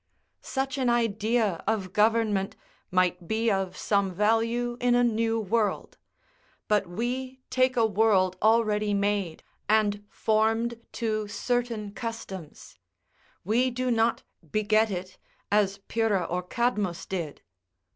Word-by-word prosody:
Such 270 0 -3
an 255 -2 +2
idea 220 -4 +1
of 210 -4 -1
government 210 -2 +2 0.3
might 180 -1 +1
be 220 +2 +1
of 195 -2 -1
some 200 -2 +1
value 225 +5 +1
in 245 0 +3
a 245 - +4
new 225 -1 +1
world; 220 +1 -1 0.7
but 210 -3 +2
we 255 +7 -4
take 255 0 +2
a 230 - +5
world 200 -3 +3
already 215 -2 +3
made, 200 -4 -1 0.3
and 205 -1 +2
formed 225 +2 +1
to 215 -2 -1
certain 230 -1 -2
customs; 205 -8 -7 0.6
we 235 +7 +2
do 255 0 -1
not 230 0 +1 0.3
beget 215 +1 +2
it, 185 -1 -6 0.3
as 200 -1 +2
Pyrrha 220 -5 +1
or 180 +1 -2
Cadmus 205 -3 -1
did. 170 -6 -5
215 Hz, 120 wpm, -27 LUFS, 200-235 Hz, 0.7 s, a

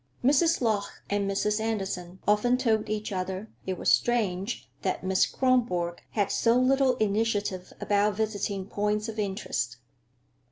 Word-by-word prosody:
Mrs. 295 +5 +4
Lorch 215 -4 +1 0.3
and 200 -1 +1
Mrs. 210 +2 0
Andersen 195 -5 -3
often 210 +4 +3
told 220 -4 +1
each 215 0 -2
other 190 +2 -4 0.2
it 185 -1 -2
was - - +2
strange 215 -3 +1
that 185 - -2
Miss 185 0 +3
Kronborg 225 -10 +1
had 205 -3 +1
so 230 +1 +3
little 260 0 +3
initiative 205 -4 0
about 205 0 +2
"visiting 205 -2 -2
points 210 +2 -1
of 220 -1 -5
interest." 190 - -2
210 Hz, 135 wpm, -28 LUFS, 195-225 Hz, 0.3 s, Mrs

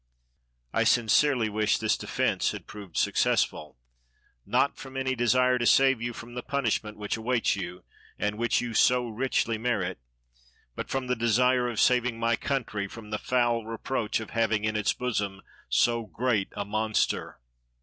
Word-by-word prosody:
I - - +2
sincerely 120 +1 +3
wish 110 0 +1
this - - +1
defence - - 0
had - - -8
proved 100 -3 -10
successful, 75 -4 +1 0.7
not - - +2
from 135 0 -9
any 130 0 0
desire 125 +1 +3
to 120 - +1
save 135 -3 +4
you 120 +1 -2
from 120 +1 -10
the 125 - -4
punishment 115 -6 -2
which 105 +1 -3
awaits 120 +1 +1
you, 90 -2 -6 0.3
and 105 +1 -1
which 120 0 +1
you 120 -1 -4
so 125 +2 +3
richly 115 -1 -1
merit, 100 - -1 0.8
but - - -5
from 135 -1 -2
the 125 0 0
desire 125 +2 +2
of 115 - -4
saving 125 -2 +2
my 115 0 +2
country 110 -7 -2
from 105 +1 -11
the 105 - -2
foul 120 -2 +1
reproach 115 +1 -2
of 110 - -8
having 110 -2 +1
in 110 0 -1
its 105 -1 +1
bosom 105 -6 -3 0.3
so 115 -2 +2
great 115 -5 0
a 100 -1 -4
monster. 110 - -1
115 Hz, 160 wpm, -27 LUFS, 105-125 Hz, 0.8 s, save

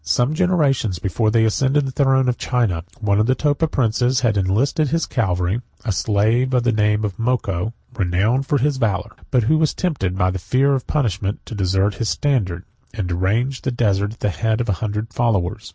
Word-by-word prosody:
Some 120 - +1
generations 150 - +1
before 105 +5 0
they 110 0 +3
ascended 135 +6 +1
the 135 - -3
throne 135 -1 +2
of 125 - -1
China, 105 -10 0 0.2
one 100 -2 +2
of 110 - +2
the 130 - +3
Topa 150 +3 0
princes 125 -1 +1
had 115 -4 +2
enlisted 115 - +1
in - - -5
his 165 0 +1
cavalry 95 -1 -1 0.2
a 110 - 0
slave 110 +6 +1
of 125 - +2
the 120 - +2
name 105 0 +1
of 100 -3 -4
Moko, 115 -4 -1 0.2
renowned 105 +7 0
for 145 - +2
his 140 +1 0
valor, 105 -7 -1 0.2
but 125 -3 +2
who 155 +8 +2
was 155 -2 +1
tempted, 95 - -2
by 95 -1 +2
the 95 - -4
fear 130 +10 +2
of 130 -2 -2
punishment, 105 - -1
to - - -8
desert 95 0 +1
his 115 - 0
standard, 100 -12 0 0.3
and 100 -5 -3
to 85 - -1
range 115 +9 0
the - - -2
desert 105 -4 0
at 115 - -17
the 105 - +1
head 110 +3 -1
of 120 -1 -2
a - - +3
hundred 110 +1 -3
followers. 110 -3 -1
115 Hz, 210 wpm, -20 LUFS, 100-130 Hz, 0.3 s, they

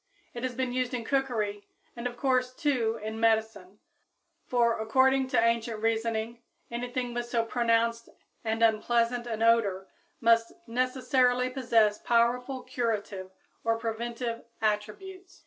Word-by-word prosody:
It 240 - -6
has 255 -1 -3
been 255 -1 -2
used 255 0 -1
in 235 -2 -4
cookery 220 -7 -1 0.3
and 235 +1 -3
of 240 0 -8
course, 255 -1 +1
too, 240 -7 0
in 220 +1 -4
medicine; 220 -4 0 0.7
for, 235 -2 +2
according 260 +4 +3
to 260 - +2
ancient 230 -1 +1
reasoning, 225 +1 -1 0.3
anything 245 +1 -3
with 240 0 -3
so 235 -1 0
pronounced 230 0 +1 0.3
and 225 0 0
unpleasant 235 +2 +2
an 225 -1 -2
odor 205 -5 +3 0.3
must 230 0 +3
necessarily 255 +1 +1
possess 230 -5 +2
powerful 245 +2 +1
curative 215 -7 -3 0.3
or 225 0 +1
preventive 230 +1 -4 0.2
attributes! 360 - -3
235 Hz, 130 wpm, -28 LUFS, 225-250 Hz, 0.7 s, according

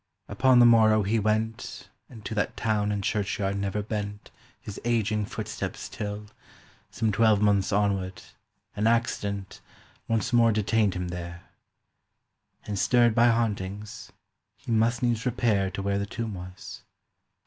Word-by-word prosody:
'" - - -58
Upon 125 +5 +3
the 120 - +8
morrow 110 -2 +5
he 110 +3 +1
went 110 +1 -2 0.2
And 110 -4 -13
to - - -4
that 105 -2 -2
town 105 -2 0
and 100 -1 -2
churchyard 100 -1 -1
never 100 +1 -2
bent 105 -1 -5 0.3
His 105 - -9
ageing 110 -3 0
footsteps - - -5
till, 105 -1 -5 0.6
some 110 -1 -1
twelvemonths 105 -2 +3
onward, 100 -2 0 0.5
An 105 +2 +1
accident 100 -4 -1 0.5
Once 115 +1 -1
more 115 -1 +5
detained 105 -1 +1
him 90 -1 -3
there; 85 0 -7 1.2
And, 105 -2 -3
stirred 120 -1 +4
by 120 +1 +5
hauntings, 105 -2 -2 0.5
he - - -7
must 115 +2 +2
needs 120 -2 +1
repair 110 -6 +1
To 95 +1 -5
where 100 0 0
the 100 - -3
tomb 115 0 -4
was. 90 +1 -9
105 Hz, 140 wpm, -26 LUFS, 100-115 Hz, 1.2 s, the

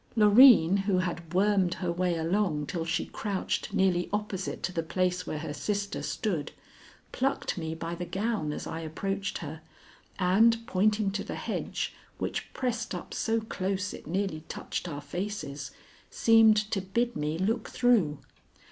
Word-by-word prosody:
Loreen, 210 -4 +8
who 195 -3 +3
had 175 -2 -3
wormed 190 -1 +2
her 180 -2 -2
way 175 0 0
along 165 -2 0
till 165 +2 -3
she 165 - -1
crouched 200 -3 -3
nearly 180 -2 +2
opposite 205 -2 -3
to - - -1
the 165 - 0
place 180 +2 -1
where 155 - -3
her 150 -1 -5
sister 200 +6 -2
stood, 170 -9 -2 0.6
plucked 270 +2 -1
me 160 -2 -4
by 165 +1 -4
the 175 +1 -5
gown 195 -3 -1
as - - -5
I 160 - -4
approached 195 +5 -3
her, 155 +2 -7 0.6
and, 225 +5 +4
pointing 210 -1 +2
to 200 +1 -3
the - - -5
hedge, - - -3 0.2
which - - -3
pressed 240 -2 -2
up - - -7
so 225 0 0
close 195 -2 -2
it - - -10
nearly 180 -2 -2
touched 180 - -4
our 145 -2 -5
faces, 145 -4 -5 0.4
seemed 225 -1 +5
to 195 - 0
bid 235 +6 -1
me 150 +2 -1
look 220 +5 -1
through. 210 - +3
190 Hz, 155 wpm, -29 LUFS, 165-210 Hz, 0.6 s, Loreen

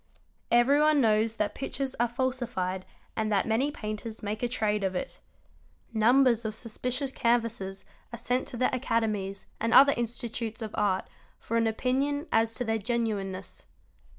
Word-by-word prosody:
Everyone 285 +5 +5
knows 220 -2 +3
that 210 -2 -1
pictures 270 0 -3
are 240 - +3
falsified 235 -7 -2 0.3
and 215 -1 -1
that 200 -2 +2
many 230 +6 +2
painters 215 -4 -6
make 210 +1 -3
a 245 - +1
trade 210 -4 0
of 190 -1 -1
it. 265 - -4 0.7
Numbers 235 +1 +4
of 215 -1 -3
suspicious 250 +4 -3
canvases 230 -6 0 0.3
are 235 - -6
sent 250 +2 -1
to 245 - -7
the 255 +2 +1
academies 215 -6 -1
and 230 +1 +1
other 280 +1 +8
institutes 235 -1 -3
of 215 - -6
art 195 -3 +1 0.3
for 230 - -4
an 230 -1 +3
opinion 270 +6 0
as 225 0 +2
to 245 - -2
their 225 0 0
genuine 220 -3 -1
ness. 185 +1 -8
230 Hz, 155 wpm, -28 LUFS, 215-250 Hz, 0.7 s, other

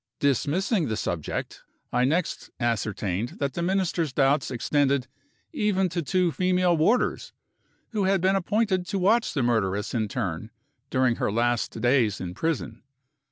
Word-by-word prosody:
Dismissing 155 - +1
the 110 - -2
subject, 85 -6 -4 0.3
I 125 - +3
next 165 +6 -1
ascertained 110 -2 -2
that 140 -2 -2
the 170 - -3
Minister's 175 -4 0
doubts 140 +2 +2
extended 140 +1 +1 0.5
even 210 - +1
to 170 0 -2
the - - -10
two 180 -2 +2
female 180 0 +2
warders, 190 +10 +1 0.6
who 210 -4 -1
had 195 0 +3
been 190 +2 +2
appointed 195 -1 0
to 200 - -2
watch 210 +4 +2
the 135 - +1
murderess 105 -4 0
in 110 -3 0
turn, 105 - -3 0.4
during 130 -2 +2
her - - 0
last 120 +1 0
days 120 -5 +2
in 90 -1 -5
prison. 125 - -3
140 Hz, 150 wpm, -26 LUFS, 115-185 Hz, 0.6 s, I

